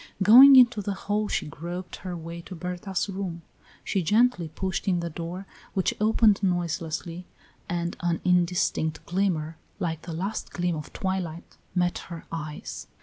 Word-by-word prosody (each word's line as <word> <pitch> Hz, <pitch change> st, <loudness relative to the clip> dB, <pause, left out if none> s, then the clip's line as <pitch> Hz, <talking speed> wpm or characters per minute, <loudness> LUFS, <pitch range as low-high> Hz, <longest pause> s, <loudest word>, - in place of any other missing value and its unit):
Going 260 Hz, +7 st, +10 dB
into 245 Hz, -4 st, +6 dB
the 200 Hz, 0 st, -3 dB
hall 205 Hz, +2 st, -1 dB
she -, -, -1 dB
groped 175 Hz, +5 st, -6 dB
her 180 Hz, -2 st, -6 dB
way 170 Hz, +1 st, -7 dB
to 185 Hz, -, -7 dB
Berta's 180 Hz, +3 st, -3 dB
room. 185 Hz, -4 st, -5 dB, 0.4 s
She 195 Hz, -, 0 dB
gently 210 Hz, 0 st, +3 dB
pushed 185 Hz, +5 st, -3 dB
in 180 Hz, -2 st, +2 dB
the 170 Hz, 0 st, -4 dB
door, 170 Hz, +4 st, -6 dB, 0.3 s
which 190 Hz, -, +1 dB
opened 215 Hz, -1 st, +4 dB
noiselessly, 175 Hz, -1 st, -2 dB, 0.4 s
and 175 Hz, 0 st, -2 dB
an 170 Hz, -1 st, 0 dB
indistinct 175 Hz, -3 st, +1 dB
glimmer, 170 Hz, -4 st, -1 dB, 0.2 s
like 165 Hz, -5 st, -3 dB
the 165 Hz, -, -7 dB
last 190 Hz, +6 st, -4 dB
gleam 175 Hz, -1 st, 0 dB
of 150 Hz, -2 st, -7 dB
twilight, 185 Hz, -3 st, -4 dB, 0.2 s
met 175 Hz, -1 st, +1 dB
her 170 Hz, -2 st, -8 dB
eyes. 155 Hz, -2 st, -6 dB
180 Hz, 150 wpm, -26 LUFS, 165-195 Hz, 0.4 s, Going